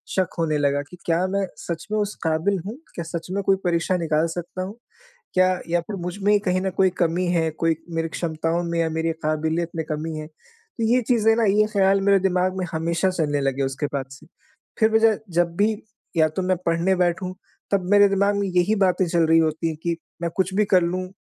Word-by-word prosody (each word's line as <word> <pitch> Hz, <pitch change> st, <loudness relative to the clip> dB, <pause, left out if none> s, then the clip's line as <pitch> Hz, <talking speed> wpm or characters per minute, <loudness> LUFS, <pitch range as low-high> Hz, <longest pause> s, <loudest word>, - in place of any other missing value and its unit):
शक 185 Hz, -2 st, +1 dB
होने 155 Hz, -2 st, +1 dB
लगा 145 Hz, -1 st, +1 dB
कि, 180 Hz, +5 st, -14 dB
क्या 170 Hz, +2 st, +2 dB
मैं 195 Hz, +1 st, 0 dB
सच 170 Hz, +1 st, -6 dB
में 215 Hz, -, +1 dB
उस 205 Hz, 0 st, -2 dB
काबिल 165 Hz, +4 st, +1 dB
हूँ? 220 Hz, +6 st, -6 dB, 0.2 s
क्या 170 Hz, -, -3 dB
सच 165 Hz, 0 st, -5 dB
में 200 Hz, -, -1 dB
कोई 195 Hz, -, +4 dB
परीक्षा 175 Hz, +2 st, +1 dB
निकाल 160 Hz, -1 st, +1 dB
सकता 175 Hz, +1 st, -5 dB
हूँ? 200 Hz, +5 st, -7 dB, 0.6 s
क्या 185 Hz, 0 st, +4 dB, 0.2 s
या 170 Hz, 0 st, +2 dB
फ़िर 200 Hz, +3 st, -6 dB
मुझ 175 Hz, +2 st, -4 dB
में 205 Hz, +1 st, +4 dB
कहीं 185 Hz, -2 st, 0 dB
न 190 Hz, -, 0 dB
कोई 190 Hz, -1 st, +5 dB
कमी 175 Hz, +2 st, +1 dB
है 165 Hz, -2 st, +1 dB
कोई 165 Hz, +1 st, 0 dB, 0.2 s
मेरी 165 Hz, 0 st, -1 dB
क्षमताओं 165 Hz, +1 st, -2 dB
में 170 Hz, 0 st, -2 dB
या 165 Hz, -1 st, +1 dB
मेरी 160 Hz, +1 st, -1 dB
काबिलियत 160 Hz, +2 st, 0 dB
में 160 Hz, -1 st, -2 dB
कमी 155 Hz, +1 st, -3 dB
है? 155 Hz, -, -7 dB
तो 450 Hz, -, -11 dB
ये 255 Hz, -, +4 dB
चीज़ें 225 Hz, -2 st, +4 dB
ना 230 Hz, -, +1 dB
ये 210 Hz, +1 st, +4 dB
ख़्याल 195 Hz, -1 st, +3 dB
मेरे 200 Hz, 0 st, +4 dB
दिमाग 185 Hz, 0 st, +1 dB
में 185 Hz, -, -1 dB
हमेशा 165 Hz, +3 st, 0 dB
चलने 150 Hz, -5 st, 0 dB
लगे 135 Hz, 0 st, 0 dB
उसके 135 Hz, +2 st, -2 dB
बाद 135 Hz, -2 st, -2 dB
से। 135 Hz, -, -13 dB, 0.5 s
फ़िर 220 Hz, 0 st, +4 dB
मुझे 220 Hz, -1 st, +4 dB, 0.2 s
जब 170 Hz, -1 st, +1 dB
भी 210 Hz, +2 st, +3 dB, 0.4 s
या 155 Hz, -1 st, +5 dB
तो 170 Hz, +5 st, -3 dB
मैं 185 Hz, 0 st, +1 dB
पढ़ने 170 Hz, +3 st, +2 dB
बैठूँ 180 Hz, +1 st, 0 dB, 0.4 s
तब 195 Hz, -2 st, +2 dB
मेरे 205 Hz, -1 st, +7 dB
दिमाग 200 Hz, +1 st, +2 dB
में 200 Hz, -, 0 dB
यही 180 Hz, +3 st, +2 dB
बातें 185 Hz, 0 st, +2 dB
चल 170 Hz, -1 st, +2 dB
रही 165 Hz, 0 st, +5 dB
होती 160 Hz, 0 st, 0 dB
कि 170 Hz, -1 st, -1 dB, 0.2 s
मैं 170 Hz, -, 0 dB
कुछ 190 Hz, 0 st, +1 dB
भी 210 Hz, 0 st, +3 dB
कर 180 Hz, -, +5 dB
लूँ 185 Hz, +2 st, -2 dB
175 Hz, 220 wpm, -23 LUFS, 165-195 Hz, 0.6 s, मेरे